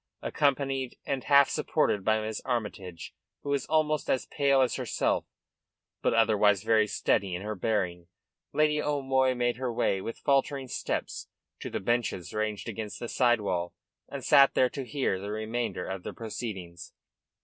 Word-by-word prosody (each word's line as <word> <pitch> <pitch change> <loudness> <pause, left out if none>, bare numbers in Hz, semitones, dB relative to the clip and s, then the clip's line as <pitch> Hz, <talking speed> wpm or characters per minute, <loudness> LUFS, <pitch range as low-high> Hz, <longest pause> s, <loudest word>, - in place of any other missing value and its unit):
Accompanied 135 -3 0
and 135 -2 -2
half 140 -1 +6
supported 100 - 0
by 110 +1 +2
Miss 110 0 -4
Armytage, 100 -8 -4 0.3
who 145 - -5
was 140 -2 0
almost 155 -1 +1
as 130 - +1
pale 140 -2 +2
as 130 - +2
herself, - - 0 0.8
but - - +2
otherwise 105 -3 +4
very 110 -1 +3
steady 95 -2 0
in 90 - -5
her 105 +1 -3
bearing, 90 -4 -1 0.4
Lady 150 0 +2
O'Moy 135 -3 +1
made 120 -1 0
her 130 -1 -2
way, 95 -4 0
with 115 - -5
faltering 140 -1 +1
steps - - -3 0.3
to - - -5
the - - -3
benches 120 -4 -1
ranged 110 0 -2
against 110 -1 -5
the 120 - -4
side 120 -3 +3
wall, 90 -3 -2 0.3
and - - -6
sat 140 0 +6
there 125 - +3
to 135 -2 -5
hear 130 -10 -1
the 100 +2 -6
remainder 110 -2 -3
of 95 -1 -5
the - - -6
proceedings. 100 -7 -7
115 Hz, 160 wpm, -28 LUFS, 105-135 Hz, 0.8 s, half